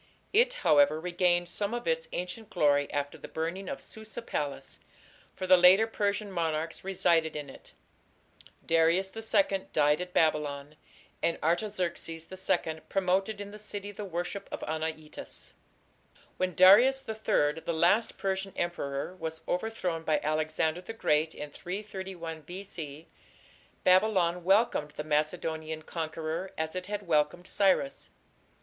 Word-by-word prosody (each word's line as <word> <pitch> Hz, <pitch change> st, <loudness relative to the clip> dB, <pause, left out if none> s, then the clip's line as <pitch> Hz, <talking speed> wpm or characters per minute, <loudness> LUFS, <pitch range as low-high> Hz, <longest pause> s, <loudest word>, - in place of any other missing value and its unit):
It, -, -, +4 dB
however, 145 Hz, +1 st, +5 dB
regained 175 Hz, 0 st, +1 dB
some 205 Hz, +5 st, 0 dB
of 240 Hz, -, -5 dB
its 485 Hz, 0 st, 0 dB
ancient 180 Hz, +5 st, -5 dB
glory 145 Hz, -6 st, +2 dB
after 145 Hz, 0 st, -3 dB
the -, -, -8 dB
burning 170 Hz, +5 st, -4 dB
of 280 Hz, -, -4 dB
Susa 220 Hz, +1 st, -6 dB
palace, 145 Hz, -9 st, -4 dB, 0.6 s
for 185 Hz, -, -4 dB
the 185 Hz, 0 st, +7 dB
later 185 Hz, +5 st, +7 dB
Persian 205 Hz, -2 st, -1 dB
monarchs 165 Hz, -2 st, -2 dB
resided 170 Hz, -4 st, +2 dB
in 145 Hz, -2 st, -5 dB
it. -, -, -15 dB, 0.9 s
Darius 165 Hz, +4 st, +3 dB
II 200 Hz, -3 st, +1 dB
died 150 Hz, +2 st, +3 dB
at 180 Hz, 0 st, -5 dB
Babylon, 150 Hz, -3 st, 0 dB, 0.5 s
and 170 Hz, -, +1 dB
Artaxerxes 170 Hz, -2 st, -1 dB
II 175 Hz, -4 st, -1 dB
promoted 195 Hz, +2 st, +1 dB
in 205 Hz, 0 st, -7 dB
the 210 Hz, -, -10 dB
city 205 Hz, -1 st, -6 dB
the 205 Hz, +1 st, -7 dB
worship 180 Hz, +1 st, -4 dB
of -, -, -5 dB
Anaitis. 155 Hz, 0 st, -5 dB, 0.9 s
When 185 Hz, -2 st, -1 dB
Darius 240 Hz, -, +7 dB
III, 165 Hz, -9 st, +1 dB
the -, -, -25 dB
last 175 Hz, +8 st, +2 dB
Persian 195 Hz, 0 st, -2 dB
emperor, 170 Hz, -2 st, -3 dB
was 160 Hz, -1 st, -5 dB
overthrown 180 Hz, -4 st, -2 dB
by 155 Hz, -1 st, +1 dB
Alexander 155 Hz, +2 st, 0 dB
the 225 Hz, -, -7 dB
Great 155 Hz, -7 st, +1 dB
in 150 Hz, 0 st, -7 dB
331 185 Hz, -3 st, -6 dB
B.C., 165 Hz, -3 st, -8 dB, 0.8 s
Babylon 185 Hz, -2 st, +3 dB
welcomed 190 Hz, -6 st, +2 dB
the 150 Hz, -, -2 dB
Macedonian 155 Hz, +1 st, -1 dB
conqueror 160 Hz, +2 st, -4 dB
as 160 Hz, 0 st, -2 dB
it 185 Hz, 0 st, -5 dB
had 205 Hz, 0 st, -4 dB
welcomed 155 Hz, +1 st, +1 dB
Cyrus. 200 Hz, +9 st, +1 dB
175 Hz, 135 wpm, -29 LUFS, 155-195 Hz, 0.9 s, the